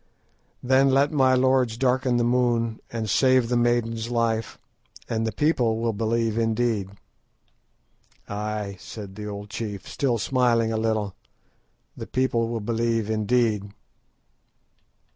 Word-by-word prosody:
"Then 130 +2 +4
let 135 +2 +3
my 130 -3 +4
lords 130 -3 +2
darken 130 -1 +1
the 120 - +2
moon, 120 -2 +1
and 115 -2 -3
save 130 +1 +3
the 125 - +1
maiden's 120 -1 0
life, 115 -2 -1 0.5
and 115 0 -1
the - - -1
people 125 -7 +1
will 115 0 -1
believe 115 +1 0
indeed." 115 -3 0 1.4
"Ay," 105 -1 -4
said 95 +4 -9
the 105 +1 -7
old 105 0 -7
chief, 105 -3 -5
still 130 -4 0
smiling 115 -2 +1
a - - -1
little, 110 -3 -1 0.8
"the - - -7
people 125 -3 0
will 115 -1 -3
believe 115 0 -1
indeed." 110 -2 0
115 Hz, 125 wpm, -24 LUFS, 110-125 Hz, 1.4 s, Then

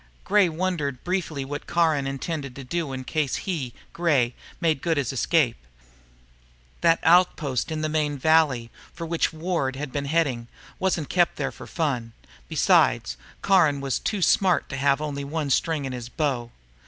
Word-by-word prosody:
Gray 200 -2 +4
wondered 160 -6 -2
briefly 175 -6 -2
what 145 +2 -6
Caron 160 -5 +2
intended 135 -1 -4
to 140 - -7
do 155 +2 -3
in 130 0 -5
case 150 -1 -1
he, 155 -10 -3 0.2
Gray, 140 -8 +2 0.3
made 160 -5 +1
good 165 -2 0
his 140 -2 -1
escape. 135 -3 +2 1.2
That 165 0 +5
outpost 160 -6 +3
in 155 -1 -2
the 155 - 0
main 150 -2 0
valley, 140 -6 +3 0.2
for 170 - -6
which 165 0 0
Ward 160 -5 -2
had 140 0 -5
been 140 +1 -3
heading, 140 -6 0 0.3
wasn't 175 -6 0
kept 175 -2 +2
for - - -4
fun. 125 -9 -2 0.4
Besides, - - +3 0.3
Caron 170 -8 +4
was 135 -1 -1
too 205 -4 -1
smart 180 +1 +3
to 135 - -4
have 140 +1 +2
only 145 -2 -3
one 145 0 -3
string 160 +1 +1
to 135 - -4
his 120 -1 -6
bow. 130 -5 -1
150 Hz, 160 wpm, -25 LUFS, 135-165 Hz, 1.2 s, That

